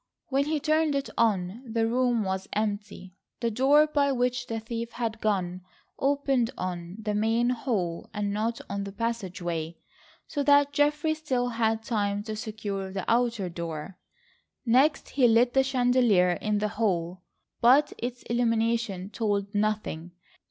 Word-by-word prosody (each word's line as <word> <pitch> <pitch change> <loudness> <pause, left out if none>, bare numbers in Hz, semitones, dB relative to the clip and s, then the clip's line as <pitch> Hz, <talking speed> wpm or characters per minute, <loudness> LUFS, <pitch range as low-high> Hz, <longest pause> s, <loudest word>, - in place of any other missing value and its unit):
When 275 +1 +2
he 305 0 0
turned 310 0 +2
it 275 0 -2
on 200 -1 +1
the 230 -2 -1
room 240 -1 +1
was 190 0 -3
empty. 205 -3 -3 0.3
The 235 -1 0
door 275 +6 +5
by 285 -2 +1
which 250 -1 0
the 225 -1 -3
thief 230 +1 -5
had 225 -2 -3
gone 185 -4 -1 0.4
opened 275 -3 +1
on 175 -1 -4
the 210 -1 -2
main 225 +3 +2
hall 210 -9 -2
and 205 -2 -2
not 225 +3 -1
on 200 0 -3
the 200 - -6
passageway, 185 -7 -3 0.5
so 290 - -2
that 285 0 +4
Geoffrey 295 +2 +2
still 260 -6 -1
had 225 -1 0
time 205 -3 -1
to 215 0 -5
secure 210 -3 -4
the 190 -2 -4
outer 235 -4 +1
door. 170 +1 -6 0.7
Next 270 +5 +3
he 260 -3 +3
lit 240 +2 +4
the 270 - +5
chandelier 245 -8 +3
in 210 +4 -1
the 210 +1 0
hall, 180 -5 -1 0.4
but 265 +5 +5
its 245 +1 -5
illumination 230 -4 0
told 205 -2 -1
nothing. 205 -5 -2
225 Hz, 150 wpm, -27 LUFS, 200-250 Hz, 0.7 s, door